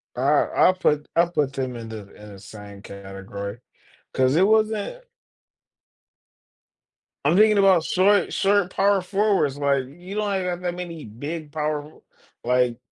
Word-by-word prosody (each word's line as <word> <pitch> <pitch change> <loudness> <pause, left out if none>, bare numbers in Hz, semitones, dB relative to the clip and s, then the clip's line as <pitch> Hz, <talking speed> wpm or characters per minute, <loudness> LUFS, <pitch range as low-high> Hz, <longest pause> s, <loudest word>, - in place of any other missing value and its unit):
I 125 - -4 0.3
I'll 185 - +5
put 150 -5 0
I'll 170 +1 +3
put 145 -5 0
them 130 -3 -3
in 115 -1 -8
the 110 -1 -7
in 105 0 -13
the 100 - -12
same 100 0 -12
category, 100 +1 -8 0.5
'cause 130 +1 +2
it 185 +4 +4
wasn't 220 - 0 2.2
I'm 155 +4 +3
thinking 215 +1 +5
about 190 -4 +5
short 195 +3 +2
short 200 -2 +2
power 195 +1 +2
forwards, 195 -7 0
like, 140 -2 +1
you 175 +8 -11
don't 205 -1 -1
even 190 -1 -2
have 175 0 -3
that 175 -1 -3
many 170 -3 -7
big 145 +8 -7
power, 150 0 -3 0.5
like 125 -1 +1
155 Hz, 150 wpm, -23 LUFS, 125-190 Hz, 2.2 s, I'll